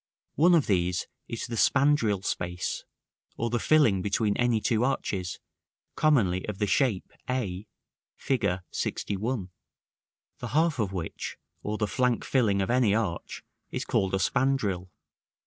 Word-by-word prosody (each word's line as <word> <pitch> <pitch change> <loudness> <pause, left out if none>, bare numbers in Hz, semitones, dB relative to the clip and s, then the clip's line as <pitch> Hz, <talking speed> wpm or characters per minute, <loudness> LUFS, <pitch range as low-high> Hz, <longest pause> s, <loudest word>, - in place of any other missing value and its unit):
One 175 +3 +5
of 160 - +3
these 90 -3 +1 0.2
is 115 - -4
the 120 - -7
spandril 115 -8 +3
space, 90 0 -3 0.5
or 115 0 -1
the 120 - +1
filling 120 -12 +4
between 105 +1 +1
any 120 -2 +2
two 115 +1 +1
arches, 95 -9 -2 0.6
commonly 105 - +3
of 105 -2 -4
the 105 - +1
shape 105 -1 +1 0.2
a, 105 -6 -2 0.5
Fig. 130 -4 -1 0.3
LXI.; 105 0 -2 0.9
the 125 - -4
half 155 +2 +1
of 105 -4 0
which, 90 -4 -5 0.2
or 105 +1 -3
the 105 - +1
flank 125 +3 0
filling 105 -7 +2
of 95 - -1
any 120 -5 +3
arch, 100 -7 -3 0.3
is - - -4
called 95 0 +1
a - - +2
spandril. 105 -7 0
110 Hz, 140 wpm, -28 LUFS, 95-130 Hz, 0.9 s, One